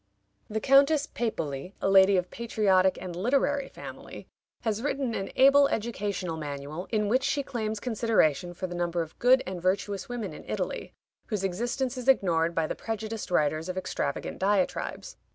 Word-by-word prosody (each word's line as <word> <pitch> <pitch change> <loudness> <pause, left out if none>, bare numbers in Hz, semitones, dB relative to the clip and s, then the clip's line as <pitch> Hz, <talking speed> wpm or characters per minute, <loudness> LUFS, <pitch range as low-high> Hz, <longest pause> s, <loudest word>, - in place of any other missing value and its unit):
The 220 0 -1
Countess 275 +5 +5
Pepoli, 165 - -4
a - - 0
lady 195 0 +6
of 180 0 -2
patriotic 195 -5 +2
and 180 -2 -6
literary 275 +7 +1
family, - - -10 0.4
has 220 -2 -1
written 270 -3 -1
an 195 -2 -3
able 275 +1 +6
educational 205 -8 -3
manual, 145 +3 -6
in 210 -2 0
which 250 +5 +2
she 280 +1 0
claims 220 -4 -3
consideration 205 - +1
for 185 - -4
the 175 - -5
number 175 -1 -1
of 160 - -14
"good 260 +2 +5
and 185 -1 -5
virtuous 195 +3 -1
women" 240 -3 -4
in - - -10
Italy, - - -3 0.4
whose 210 -3 -2
existence 240 +7 -2
is 250 - -7
ignored 170 -9 +3
by 165 - +1
the - - -2
prejudiced 220 -1 -5
writers 155 0 +1
of 185 - -4
extravagant 185 - -3
diatribes. 200 - -1
205 Hz, 165 wpm, -28 LUFS, 180-240 Hz, 0.4 s, lady